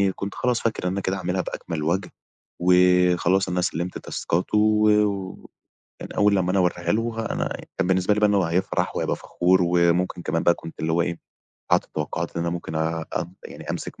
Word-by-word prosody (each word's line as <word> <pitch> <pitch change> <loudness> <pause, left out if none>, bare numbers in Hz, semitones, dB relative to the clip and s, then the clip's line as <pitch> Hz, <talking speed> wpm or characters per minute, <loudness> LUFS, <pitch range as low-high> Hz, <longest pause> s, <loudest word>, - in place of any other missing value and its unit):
كنت 100 0 -5
خلاص 125 -2 0
فاكر 110 -5 -1
إن 95 +2 -1
كده 95 0 -1
هاعملها 95 0 -1
بأكمَل 85 -3 -5
وَجْه 90 +4 0 0.5
وخلاص 90 +1 +4
أنا 90 0 0
سلِّمت 90 0 -2
تاسكاته 90 +5 -2
و 105 0 +4 1.1
يعني - - -8
أول 105 0 +4
لمّا 90 -2 +1
أنا 95 - +2
هاواريها 85 -1 +1
له 115 +1 -1
ه - - -4
أنا - - -2 0.2
بالنسبة 95 +2 +2
لي 105 - 0
بقى 105 -1 +4
إن - - +2
هو 100 -2 +3
هيفرح 85 +3 -1
وهيبقى - - 0
فخور 90 +1 +1
وممكن 85 +1 +2
كمان 85 -1 -1
بقى 85 - +5
كنت 80 -1 -11
اللي 80 0 -1
هو 85 +1 +2
إيه، 85 0 -2 0.5
حاطط - - +4
التوقُّعات 80 +3 -4
إن - - 0
أنا 85 - -1
ممكن 85 -2 -5
أب 80 +2 -3
يعني - - -8
أمسك - - -5
90 Hz, 190 wpm, -24 LUFS, 85-95 Hz, 1.1 s, بقى